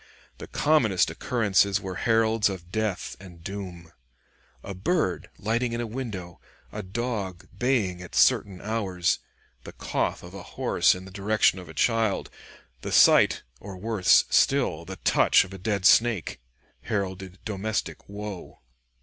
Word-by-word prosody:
The - - -8
commonest 110 - +2
occurrences 100 +1 +1
were 95 -1 -6
heralds 115 -1 +2
of 90 -2 -8
death 110 -3 -2
and 90 -3 -14
doom. 90 -4 -7 0.7
A 100 - -6
bird 95 - -1
lighting 115 +3 -1
in 115 - -2
a 120 - -2
window, 105 -7 -6 0.3
a 105 - -5
dog 100 -3 -4
baying 110 -9 0
at 90 - -10
certain 95 -3 +3
hours, 100 -5 -1 0.4
the - - -10
cough - - -2
of 90 +1 -11
a 100 - -8 0.2
horse - - +3
in 90 0 -9
the 95 - -11
direction 100 0 +2
of 90 - -11
a - - -11
child, 115 -4 +1 0.5
the - - -5
sight, - - +5 0.2
or 95 -2 -9
worse 105 -1 +3
still, 125 - +2
the 95 - -7
touch - - +4
of 95 - -11
a 95 - -8
dead 100 -1 -2
snake, 110 - +3 0.4
heralded 95 +2 -4
domestic 105 0 -4
woe. 100 -2 -7
100 Hz, 145 wpm, -26 LUFS, 95-110 Hz, 0.7 s, sight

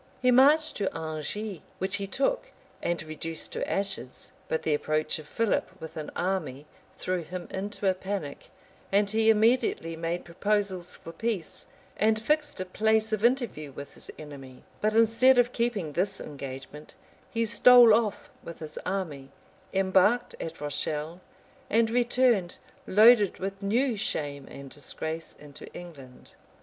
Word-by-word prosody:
He 250 0 +3
marched 290 +5 +5
to 200 -2 -1
Angers, 160 +5 -4 0.2
which 190 +2 -1
he 200 -2 -4
took 275 - -1 0.3
and 170 -1 -1
reduced 155 +1 -4
to - - -3
ashes. 195 -11 -3 0.2
But 160 - -1
the 155 - +1
approach 155 +1 0
of 150 - -11
Philip 195 -2 -1
with 160 -1 -9
an 155 -1 -5
army 160 -7 -2 0.3
threw 185 -1 -2
him 175 +2 -7
into 200 +1 -3
a 190 - +4
panic; 185 -6 -5 0.4
and 200 +1 +3
he 220 +2 +3
immediately 220 -6 +2
made 165 +2 -3
proposals 190 0 -1
for 165 - -10
peace, 195 -1 -3 0.3
and 215 +1 +3
fixed 295 +2 0
a 185 - -2
place 220 +3 +1
of 215 0 -1
interview 235 - +1
with 140 +1 -9
his - - -11
enemy; 135 -4 -11 0.2
but 215 +1 +1
instead 230 +3 +5
of 245 0 +3
keeping 215 -10 -1
this 190 +4 -1
engagement, 140 +1 -8 0.3
he 230 -1 0
stole 240 0 +8
off 215 -2 0
with 170 - -8
his 155 -1 -7
army, 160 -8 -3 0.4
embarked 195 +5 +3
at 165 0 -6
Rochelle, 150 +3 -3 0.5
and 225 +1 +3
returned, 240 -6 +2 0.3
loaded 215 -1 +6
with 195 +1 -5
new 235 +5 +1
shame 145 -8 -3
and 140 -1 -10
disgrace, 160 +2 -6
into 145 -1 -12
England. 140 -8 -11
190 Hz, 145 wpm, -28 LUFS, 155-220 Hz, 0.5 s, stole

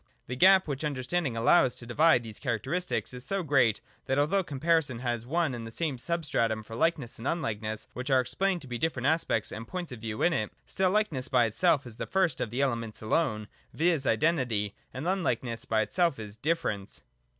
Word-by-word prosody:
The 125 - -5
gap 190 +6 +6
which 140 0 -3
understanding 140 -1 -1
allows 125 +2 +4
to 125 - -10
divide 130 +2 +4
these 110 -2 -8
characteristics, 135 - -2
is 125 0 -7
so 195 +3 -1
great, 135 -8 +3 0.3
that 135 - +1
although 175 +7 +2
comparison 150 -3 +1
has 120 -1 -3
one 165 -1 +1
and 115 -2 -6
the - - -6
same 140 +1 -3
substratum 135 -9 0
for 115 +1 -9
likeness 140 -4 0
and 120 - -4
un 170 - 0
likeness, 110 -4 -3
which 125 +2 -5
are 130 -1 +5
explained 180 +8 0
to - - -11
be 120 -1 -4
different 135 -3 -1
aspects 140 -8 +1
and 115 +1 -7
points 180 -1 -5
of 120 -3 -8
view 110 -1 -3
in 175 - +4
it, 110 -9 -1
still 190 -1 +1
likeness 180 -11 0
by 125 -3 +3
itself 140 - +2
is 115 -2 -11
the - - -4
first 185 -8 +1
of - - -1
the 125 +5 -2
elements 115 -5 -2
alone, 110 -3 0 0.3
viz. 160 -4 +2
identity, 125 -11 +1 0.2
and 130 +6 -5
unlikeness 130 -11 -1
by 110 -1 +2
itself 170 - +1
is 105 -2 -7
difference. 110 -8 -2
130 Hz, 200 wpm, -29 LUFS, 115-165 Hz, 0.3 s, gap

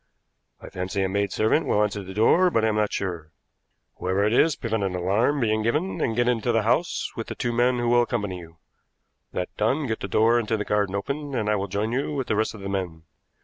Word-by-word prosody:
I - - -10
fancy 95 +1 -2
a - - +1
maidservant 100 - +1
will 105 - +3
answer 105 -1 -2
the 95 0 -9
door, 175 - +4
but 115 -9 +1
I - - +3
am 105 - -1
not 105 -1 +1
sure. 85 -5 -4 0.7
Whoever 95 +2 0
it 105 +2 +2
is, 155 +4 +4
prevent 110 -2 -2
an 95 -2 -1
alarm 105 +11 +1
being 110 -3 +1
given, 150 - -1
and 115 - 0
get 120 +1 +2
into 120 -1 +1
the 115 -2 +2
house 125 +10 0
with 115 - -5
the - - -5
two 120 -1 -2
men 125 +1 +2
who 120 0 -1
will 120 0 +5
accompany 105 -6 -2
you. 85 -1 -13 0.7
That 90 - -4
done, 130 +8 +1
get 110 -3 -2
the - - -4
door 115 +2 +3
into 110 -1 -1
the 105 - -3
garden 100 -2 0
open, 140 +7 -3
and 105 -3 0
I - - +3
will 100 0 -2
join 100 +3 -2
you 140 +4 -1
with 135 -2 -2
the 110 - -1
rest 110 +1 0
of 105 - -10
the 100 - -5
men. 90 -5 -4
110 Hz, 240 wpm, -25 LUFS, 100-120 Hz, 0.7 s, will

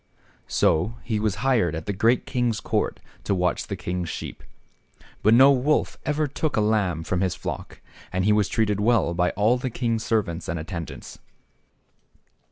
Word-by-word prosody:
So 90 +9 +1
he 110 -3 -1
was 105 -2 0
hired 110 -12 +2
at 80 - -5
the 100 - -2
great 115 +5 +2
king's 120 -3 0
court - - -1 0.2
to 100 - 0
watch 90 -1 0
the - - -3
king's 90 -1 -4
sheep. - - -7 0.8
But 110 +2 +5
no 135 +3 +8
wolf 140 +3 +1
ever 150 +1 +1
took 145 +2 -2
a - - +4
lamb 105 -6 +1
from 90 +2 -1
his 95 -2 0
flock, - - -6 0.3
and 95 0 0
he 105 - +4
was 105 -2 +2
treated 105 -3 +1
well 110 -5 +2
by 90 +1 +2
all 110 +5 +3
the 130 - -2
king's 115 -2 -1
servants 95 -8 -1
and 85 - -2
attendants. 85 0 -7
105 Hz, 175 wpm, -24 LUFS, 90-120 Hz, 0.8 s, no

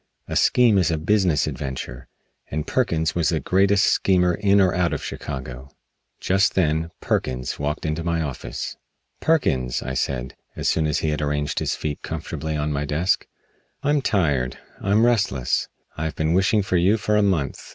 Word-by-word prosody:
A - - -4
scheme 115 -5 +4
is 90 - +2
a 80 - 0
business 90 -2 +2
adventure, 65 -2 -5 0.4
and 75 +1 -3
Perkins 85 -11 0
was 85 -3 +1
the 80 - 0
greatest 100 +4 +3
schemer 90 -2 +3
in 100 +3 +3
or 95 -2 +4
out 90 -1 +1
of - - -4
Chicago. 65 -2 -6 0.5
Just 95 +1 +2
then 80 -2 +1
Perkins 65 -1 -2
walked 75 +2 -2
into 80 +1 -2
my 85 0 0
office. 70 -5 -5 0.4
"Perkins," 65 - +1
I 65 - -4
said, 65 -1 -2 0.2
as - - -2
soon 80 -1 +2
as 75 - 0
he - - +2
had 75 - -2
arranged 75 0 -1
his - - -1
feet 75 -2 -4
comfortably 80 +1 -4
on 75 0 -1
my 70 0 -1
desk, 80 +6 0 0.6
"I'm 145 0 +2
tired. 70 - 0 0.2
I'm 105 +4 +3
restless. 100 - +1 0.3
I 80 - -3
have 80 - -3
been 80 +1 0
wishing 100 +3 +3
for 95 -2 0
you 95 +6 +3
for 105 -1 0
a 105 - +4
month. 90 -9 0
80 Hz, 175 wpm, -23 LUFS, 75-95 Hz, 0.6 s, scheme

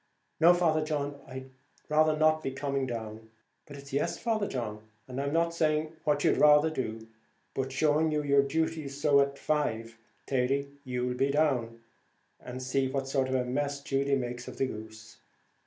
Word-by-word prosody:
"No, 170 +2 +7
Father 160 -3 +2
John, 145 -2 -3
I'd 130 0 -8 0.4
rather 155 0 +3
not 155 0 +3
be - - -2
coming 135 0 -2
down." 110 -2 -6 0.4
"But 145 - -10
it's 140 -1 -12
yes, 140 - 0
Father 220 -3 0
John, 110 -4 -4 0.3
and 130 +1 -4
I'm 140 0 -2
not 170 +1 +1
saying 155 -1 +1
what 145 -1 +2
you'd - - +3
rather 150 +1 +6
do, 115 -6 -4 0.5
but 135 0 -2
showing 155 +3 +2
you 150 -1 0
your 140 -1 +4
duty; 160 +1 -1
so 140 0 +3
at 140 0 -1
five, 115 -8 -2 0.3
Thady, 135 +2 0
you'll 125 -1 -2
be 135 +2 +1
down, 130 -6 0 0.6
and 130 +1 -7
see 130 +1 +1
what 135 0 -2
sort 135 -1 +1
of 130 - 0
a 125 -1 +1
mess 140 +3 -2
Judy 140 0 +1
makes 120 -2 -4
of - - -8
the 135 - +1
goose." 110 -2 -9
140 Hz, 175 wpm, -29 LUFS, 125-150 Hz, 0.6 s, No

